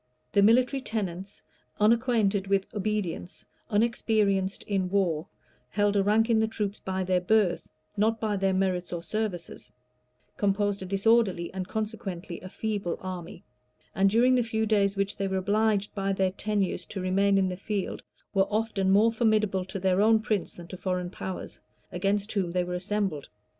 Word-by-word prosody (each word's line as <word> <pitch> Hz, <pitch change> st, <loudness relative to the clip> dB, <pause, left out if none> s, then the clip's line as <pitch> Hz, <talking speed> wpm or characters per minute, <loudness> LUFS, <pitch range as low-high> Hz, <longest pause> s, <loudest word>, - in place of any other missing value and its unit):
The 200 Hz, -, +4 dB
military 250 Hz, +6 st, +4 dB
tenants, 195 Hz, -4 st, -4 dB, 0.4 s
unacquainted 215 Hz, -3 st, +2 dB
with 195 Hz, -1 st, +2 dB
obedience, 205 Hz, -3 st, -3 dB, 0.2 s
unexperienced 210 Hz, -3 st, +1 dB
in 190 Hz, -3 st, -1 dB
war, 180 Hz, -4 st, 0 dB, 0.4 s
held 205 Hz, -1 st, +1 dB
a 200 Hz, -, +4 dB
rank 215 Hz, +3 st, +3 dB
in 230 Hz, -2 st, +3 dB
the 220 Hz, -, +2 dB
troops 210 Hz, -2 st, -3 dB
by 190 Hz, 0 st, -2 dB
their 185 Hz, 0 st, +1 dB
birth, 190 Hz, -2 st, +2 dB, 0.3 s
not 220 Hz, +2 st, +1 dB
by 215 Hz, -2 st, 0 dB
their 195 Hz, -1 st, +1 dB
merits 185 Hz, -1 st, 0 dB
or 170 Hz, -1 st, -4 dB
services; 190 Hz, -2 st, -4 dB, 0.7 s
composed 205 Hz, 0 st, +1 dB
a -, -, -4 dB
disorderly 195 Hz, -3 st, +2 dB
and 185 Hz, -1 st, -4 dB
consequently 200 Hz, -6 st, -5 dB
a 185 Hz, -, -8 dB
feeble 205 Hz, -4 st, -3 dB
army; 185 Hz, +1 st, -7 dB, 0.5 s
and 195 Hz, +1 st, +3 dB
during 240 Hz, +5 st, +4 dB
the 250 Hz, -, +4 dB
few 220 Hz, -1 st, -1 dB
days 200 Hz, -2 st, +2 dB
which 200 Hz, +1 st, -1 dB
they 195 Hz, -, -1 dB
were 190 Hz, 0 st, -1 dB
obliged 205 Hz, +1 st, +1 dB
by 195 Hz, -1 st, -1 dB
their 190 Hz, -1 st, +1 dB
tenures 195 Hz, -2 st, -2 dB
to 195 Hz, -, -6 dB
remain 195 Hz, +2 st, +2 dB
in 190 Hz, -1 st, +2 dB
the 180 Hz, -, -3 dB
field, 195 Hz, +1 st, -3 dB, 0.3 s
were 195 Hz, -1 st, +2 dB
often 215 Hz, -3 st, 0 dB
more 210 Hz, +4 st, +5 dB
formidable 215 Hz, -5 st, +1 dB
to 190 Hz, +1 st, -6 dB
their 190 Hz, +1 st, +2 dB
own 220 Hz, +1 st, +5 dB
prince 215 Hz, -2 st, -2 dB
than 175 Hz, -, -10 dB
to 185 Hz, -, -7 dB
foreign 180 Hz, -1 st, -2 dB
powers, 190 Hz, -1 st, -6 dB, 0.3 s
against 200 Hz, +3 st, -1 dB
whom 185 Hz, -5 st, -1 dB
they 180 Hz, -1 st, +1 dB
were 180 Hz, 0 st, -4 dB
assembled. 185 Hz, -5 st, -2 dB
200 Hz, 170 wpm, -27 LUFS, 185-215 Hz, 0.7 s, more